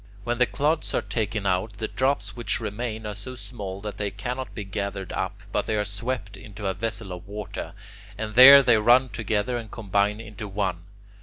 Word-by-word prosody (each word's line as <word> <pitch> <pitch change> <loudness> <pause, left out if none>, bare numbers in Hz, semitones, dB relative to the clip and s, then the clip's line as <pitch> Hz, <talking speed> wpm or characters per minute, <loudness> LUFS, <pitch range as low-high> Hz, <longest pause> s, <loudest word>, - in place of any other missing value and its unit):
When 120 +2 -2
the 125 - +5
clods 150 +3 0
are - - +2
taken 110 -2 -2
out, 95 +3 0
the 110 - -2
drops 130 -7 0
which 115 -3 0
remain 110 +1 -4
are 105 - -3
so 130 +6 -8
small 100 -6 -6
that 105 0 -6
they 105 -1 -1
cannot 125 +6 -5
be 105 - -4
gathered 100 -1 -4
up, - - -3
but - - -1
they 110 - 0
are 105 0 0
swept 105 0 -3
into 105 +1 -9
a 95 - +1
vessel 105 -1 -4
of 90 +1 -8
water, 105 -1 -6 0.4
and 110 -1 -4
there 135 +4 +11
they 120 -3 +5
run 125 +4 +5
together 110 +2 -1
and 115 -2 -9
combine 100 -1 0
into 105 -2 -7
one. 95 -3 -2
105 Hz, 200 wpm, -25 LUFS, 100-120 Hz, 0.4 s, there